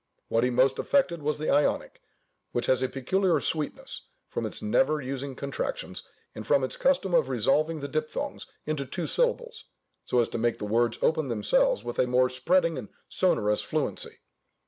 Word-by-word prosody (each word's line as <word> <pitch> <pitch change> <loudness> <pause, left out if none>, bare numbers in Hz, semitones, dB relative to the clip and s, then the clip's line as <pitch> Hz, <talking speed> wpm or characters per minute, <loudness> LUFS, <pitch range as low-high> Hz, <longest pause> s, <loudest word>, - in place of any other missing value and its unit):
What 115 +1 +2
he 125 - +3
most 130 +2 +3
affected 185 - +1
was 150 +1 -1
the 155 - -1
Ionic, 145 - +1 0.5
which 120 - 0
has 130 -1 +2
a 130 - 0
peculiar 180 +8 +1
sweetness, 155 -2 -3 0.2
from - - -2
its - - -4
never 150 +8 +2
using 135 0 -5
contractions, 140 +1 -4 0.3
and - - -7
from 140 -2 +3
its 130 - -2
custom 265 -9 +1
of 160 -6 +3
resolving 145 +6 +1
the 140 - -3
diphthongs 155 +2 -3 0.2
into 145 -3 -2
two 175 +5 -3
syllables, 485 -2 0 0.4
so 125 - +1
as 120 - +3
to - - -3
make 120 0 +1
the 105 - -5
words 115 +2 +1
open 155 -2 +2
themselves 105 -2 +2
with 120 0 -5
a 125 - +3
more 125 0 +3
spreading 165 +4 +2
and 110 - -9 0.2
sonorous 105 - +2
fluency. - - -3
140 Hz, 175 wpm, -27 LUFS, 125-160 Hz, 0.5 s, he